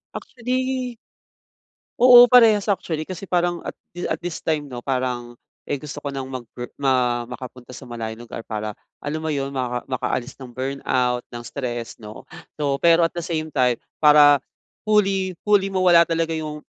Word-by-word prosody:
Actually 255 0 -3 1.0
Oo, 245 0 +10
parehas 225 -4 +6
actually. 160 -5 -1
Kasi 185 +1 -8
parang 175 -1 0
at - - -7 0.2
thi 175 - -4
at - - -1
this 175 -1 -6
time 155 -2 -1
'no, 125 -3 -8
parang, 125 -2 -3 0.3
eh, 145 - 0
gusto 145 +1 -8
ko 140 - -4
ng 135 -1 -5
magper 125 -2 -7
ma 125 -3 +2
makapunta 125 0 -9
sa 125 +1 -10
malayong 115 -1 -6
lugar 115 - -7
para 105 -1 -5 0.2
alam 155 +2 -4
mo 160 - -3
'yon, 140 -1 -2
maka 125 -2 -3
makaalis 130 0 -3
ng 130 - -8
burnout, 130 -1 -1
ng 120 0 -8
stress 120 -4 -5
'no? 105 0 -10 0.3
So, 140 -2 -1
pero 170 0 +5
at - - -3
the 170 - -4
same 160 -2 -4
time, 125 -3 +2 0.2
para 145 -2 +7 0.4
fully 195 -4 +1
fully 205 -2 +3
mawala 185 -3 +5
talaga 165 -1 0
'yong 155 -1 -5
145 Hz, 165 wpm, -22 LUFS, 125-175 Hz, 1.0 s, Oo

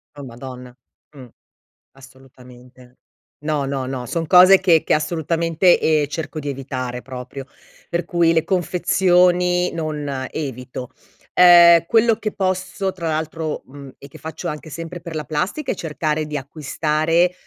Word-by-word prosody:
Oh 145 - -9
Madonna, 125 0 -10 0.4
mh, 130 -3 -11 0.7
assolutamente. 130 -1 -17 0.4
No, 150 -2 -1
no, 135 -1 -3
no, 130 -1 -5
son 165 +3 -3
cose 185 +2 +7
che 170 -4 +4
che - - +1
assolutamente, 165 +2 +1
ehm, 155 -2 +2
cerco 160 +1 -5
di 145 - -6
evitare 130 -2 -5
proprio 130 +1 -8 0.4
per 170 0 -2
cui 170 -2 +2
le 160 -1 +1
confezioni 180 0 +2
non 150 -5 -4
evito. 125 -3 -6 0.4
Uhm, 170 -2 +7
quello 225 +2 +3
che 215 -2 -4
posso 190 0 -2
tra 170 -3 -5
l'altro, 155 0 -3
mhmm, 140 +1 -12
e 140 - -13
che - - -14
faccio 160 0 -7
anche 150 +1 -7
sempre 165 +2 -7
per 170 0 -9
la 155 - -3
plastica 180 - -3
è - - -4
cercare 155 -1 -2
di 150 - -5
acquistare 155 +4 0
155 Hz, 145 wpm, -20 LUFS, 135-175 Hz, 0.7 s, cose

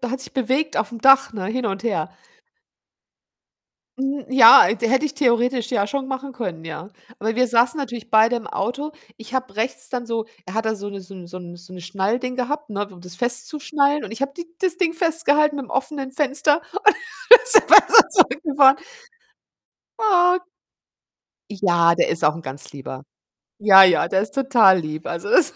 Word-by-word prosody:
da 245 -1 -5
hat 265 0 -4
sich - - -9
bewegt 270 +4 -2
aufm 220 +2 -3
Dach, 270 -1 +4
ne, 195 -4 -6
hin 235 +3 -4
und 195 0 -5
her. 200 -10 -3 1.9
Hm, 270 0 -4
ja, 255 -5 +7
de 230 +1 -3
hätte 265 +4 +1
ich 300 - -3
theoretisch 245 -2 -1
ja 200 -5 -1
schon 270 +5 -5
machen 270 +1 -6
können, 185 -10 -7
ja. 160 +3 -9 0.3
Aber 220 +2 -4
wir 255 0 +2
saßen 240 +5 +1
natürlich 240 -5 -7
beide 220 +2 +3
im 230 - -8
Auto. 270 +9 -5 0.3
Ich 225 +3 -12
habe 255 -6 -4
rechts 225 +4 -4
dann 245 -2 -5
so 230 -1 -4 0.2
er 185 - -10
hat 225 0 -2
da 220 0 -2
so 205 -1 -7
'ne 200 -1 -9
so 185 - -14
'n 180 -2 -12
so 175 +1 -11
'n 175 -1 -11
so 175 +1 -13
'ne 180 - -10
Schnallding 205 +8 -3
gehabt, 290 +3 -5
ne, 205 0 -5
um 180 -2 -16
das 180 0 -11
festzuschnallen 280 - -2
und 215 - -9
ich 225 +4 -7
habe 275 0 -3
die 345 +2 -9
das 360 -2 -2
Ding 340 -3 -1
festgehalten 305 -3 +1
mit 275 -2 -7
'm - - -17
offenen 270 0 -4
Fenster 290 +2 0
und 405 - -5
dann 465 +2 +5
ist - - +7
er - - +8
besser 455 - +6
zurückgefahren. 285 - +2 1.2
Ah. 365 -5 +2 1.1
Ja, 175 -4 +1
der 170 - 0
ist 165 - -2
auch 150 0 +2
'n 165 - -10
ganz 135 -1 -10
Lieber. 135 -1 -10 0.6
Ja, 195 -2 +7
ja, 180 -3 +2
der 190 +2 -1
ist 205 -1 -6
total 240 -9 +3
lieb. 155 -1 -7
Also, 170 +4 -6
das, 310 +4 +3
240 Hz, 195 wpm, -20 LUFS, 195-280 Hz, 1.9 s, er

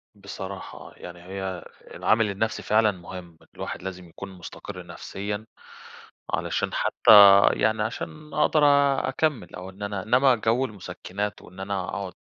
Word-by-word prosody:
بصراحة 100 -1 -8
آه، - - -12
يعني 85 0 -10
هي 95 -1 -5 0.3
العامل 110 -1 +2
النفسي 110 +3 -2
فعلًا 110 0 +3
مهم، 90 -2 -10
ان - - -22
الواحد - - -6
لازم 90 -2 -7
يكون 100 +4 -9
مستقرّ 90 -2 -9
نفسيًا، 105 +2 -6 0.9
علشان - - -1
حتّى - - +2 0.4
يعني 110 0 +1
عشان 150 +7 -6
أقدر 155 -2 +3 0.5
أكمّل، 150 0 -1
أو 90 +1 -8
إن 95 +2 -10
أنا 100 -2 -3
إنّما 125 +4 +4
جو 115 +4 +1
المُسكِّنات، 100 -1 -6
وإن 90 +2 -15
أنا 95 0 -3
أقعد 95 -2 -5
100 Hz, 140 wpm, -25 LUFS, 95-110 Hz, 0.9 s, إنّما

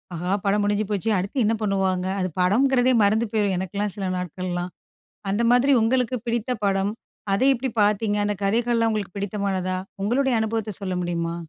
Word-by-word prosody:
ஆஹா, 180 +3 -3
படம் 205 +1 +2
முடிஞ்சு 205 +1 +1
போச்சே 210 +2 -1
அடுத்து 195 +8 -4
என்ன 225 - +2
பண்ணுவாங்க? 190 -3 0
அது 185 - 0
படங்கிறதே 250 +7 +3
மறந்து 215 +3 +3
போயிரும். 205 -4 +1
எனக்கெலாம் 200 +2 -2
சில 195 -2 -3
நாட்கள்லாம், 180 0 -4 0.6
அந்த 210 +4 0
மாதிரி 250 +3 +4
உங்களுக்கு 250 +1 +1
பிடித்த 235 +1 -1
படம் 195 +1 +1 0.4
அத 200 +6 +1
எப்படி 260 +2 -3
பாத்தீங்க? 210 0 +2
அந்த 205 - 0
கதைகள்லாம் 230 +2 +2
உங்களுக்கு 205 -3 -3
பிடித்தமானதா? 195 -2 -2 0.3
உங்களுடைய 255 +5 +1
அனுபவத்த 220 -2 -2
சொல்ல 185 -2 -3
முடியுமா? 170 -1 -2
205 Hz, 155 wpm, -23 LUFS, 190-225 Hz, 0.6 s, மாதிரி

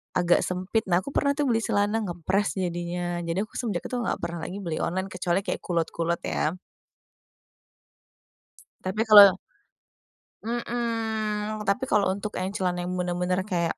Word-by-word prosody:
agak 175 -1 +4
sempit. 185 +5 -1
Nah, 175 -1 +3
aku 280 - -7
pernah, 280 - +3
tuh, 295 -1 0
beli 230 -2 +1
celana 210 +2 +1
nge-press 190 +2 -1
jadinya. 175 0 -2
Jadi, 170 +2 -2
aku 215 - -13
semenjak 210 -8 -2
itu - - -4
enggak 235 - -1
pernah 170 0 -4
lagi 185 - -5
beli 170 -5 -3
online, 185 +3 -1
kecuali 180 0 0
kayak - - -3
kulot-kulot, 170 0 -1
ya. 155 +3 -1 2.3
Tapi, 190 +4 -2
kalau 205 -3 +9 1.1
Mhm, 220 -2 -2
tapi 250 +7 +1
kalau 210 -7 +2
untuk 205 +2 -5
yang 185 - -1
celana 180 -3 -1
yang 180 +1 -3
bener-bener 180 +1 -1
kayak, 175 -5 -1
190 Hz, 150 wpm, -26 LUFS, 175-215 Hz, 2.3 s, kalau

